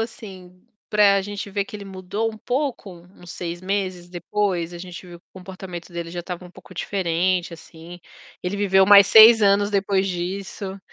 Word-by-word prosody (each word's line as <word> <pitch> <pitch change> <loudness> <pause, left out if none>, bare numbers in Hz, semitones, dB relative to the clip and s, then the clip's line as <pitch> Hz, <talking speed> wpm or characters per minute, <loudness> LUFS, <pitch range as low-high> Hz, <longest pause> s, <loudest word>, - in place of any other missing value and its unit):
assim, 185 -5 -9 0.3
pra 200 -2 +4
gente 205 +1 -6
ver 200 0 -1
que - - -14
ele 205 -1 -7
mudou 195 +4 -4
um 220 - -11
pouco? 255 -2 -3 0.3
Uns 175 -1 -13
6 175 0 -6
meses 185 -2 -3
depois, 175 -1 -2
a 175 - -8
gente 180 0 -10
viu 175 -1 -12
que - - -37
o - - -86
comportamento 185 -2 -9
dele 170 -1 -6
já 175 0 -5
estava 180 0 -7
um 180 - -13
pouco 185 - -16
diferente, 180 -1 -1
assim, 165 +1 -13 0.4
ele 180 +2 -3
viveu 190 -1 +4
mais 200 0 +8
6 220 +2 +8
anos 205 0 +3
depois 195 -1 0
disso. 190 +2 -5
190 Hz, 180 wpm, -22 LUFS, 175-200 Hz, 0.4 s, mais